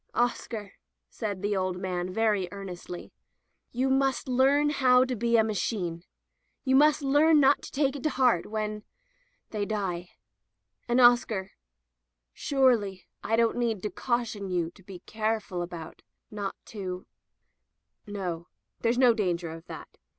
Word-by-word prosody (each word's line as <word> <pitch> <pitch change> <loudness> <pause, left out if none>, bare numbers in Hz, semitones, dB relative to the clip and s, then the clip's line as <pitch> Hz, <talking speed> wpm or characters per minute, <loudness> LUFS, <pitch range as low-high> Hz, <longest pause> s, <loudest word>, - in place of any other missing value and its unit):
"Oscar," 235 -3 -1 0.4
said 205 -2 -4
the 205 0 +1
old 185 -1 -1
man 180 -1 -3
very 210 -3 +1
earnestly, 180 -3 -8 0.6
"you 255 +2 0
must 265 -1 +1
learn 270 +3 +3
now - - -1
how 255 -2 +5
to 255 -1 -2
be 235 +1 +2
a 220 - +5
machine. 185 -5 -2 0.6
You 265 -1 +2
must 300 +1 +5
learn 295 +3 +5
not 280 0 +4
to - - -9
take 280 -1 +1
it 280 - -6
to 310 - +1
heart 250 - +2
when 215 -1 -3 0.3
— - - -42
they 210 -2 -2
die. 190 -4 -3 0.8
And 240 +1 +2
Oscar 240 -5 +4 0.4
— - - -57 0.3
surely 230 -9 +1 0.2
I 225 - +1
don't 230 0 +2
need 230 -5 -1
to 210 - -2
caution 230 -4 -2
you 170 -2 -1
to 190 - -19
be 185 -1 -11
careful 215 -4 -2
about 170 -2 -7 0.2
— - - -22
^not 205 -2 -3 0.2
to 185 -3 -5 0.5
— - - -50
no, 175 -3 -4 0.3
there's 235 +1 +1
no 250 -2 +6
danger 175 -6 -1
of 165 0 -10
that. - - -10
215 Hz, 160 wpm, -28 LUFS, 185-255 Hz, 0.8 s, no